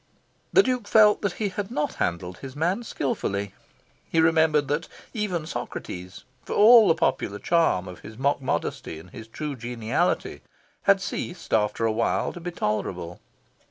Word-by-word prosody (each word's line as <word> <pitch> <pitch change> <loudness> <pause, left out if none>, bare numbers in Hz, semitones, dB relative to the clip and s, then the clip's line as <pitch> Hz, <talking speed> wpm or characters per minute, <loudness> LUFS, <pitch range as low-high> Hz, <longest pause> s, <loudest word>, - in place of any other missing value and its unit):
The 390 - +6
Duke 250 -5 -1
felt 210 -1 +5
that 200 -3 -1
he 205 +2 -2
had 195 +1 -4
not 190 -10 -2
handled 90 +1 -2
his 135 -1 -9
man 175 +9 0
skilfully. 100 - -3 0.6
He 165 - +1
remembered 160 -2 +3
that 150 +5 -1 0.3
even 190 -8 -2
Socrates, 90 - -6 0.2
for - - -5
all 225 +1 +8
the 165 - +4
popular 105 -9 0
charm 165 - +2
of 90 -1 -9
his 110 +1 -11
mock 140 +2 +1
modesty 130 -9 -3
and 85 +3 -13
his 110 -1 -10
true 145 +5 -5
geniality, 120 +7 -1 0.5
had 195 -1 +6
ceased 175 0 -5
after 110 +1 +2
a 110 - +2
while 115 +1 0
to - - -8
be 175 +1 -5
tolerable. 95 - -3
150 Hz, 160 wpm, -25 LUFS, -, 0.6 s, all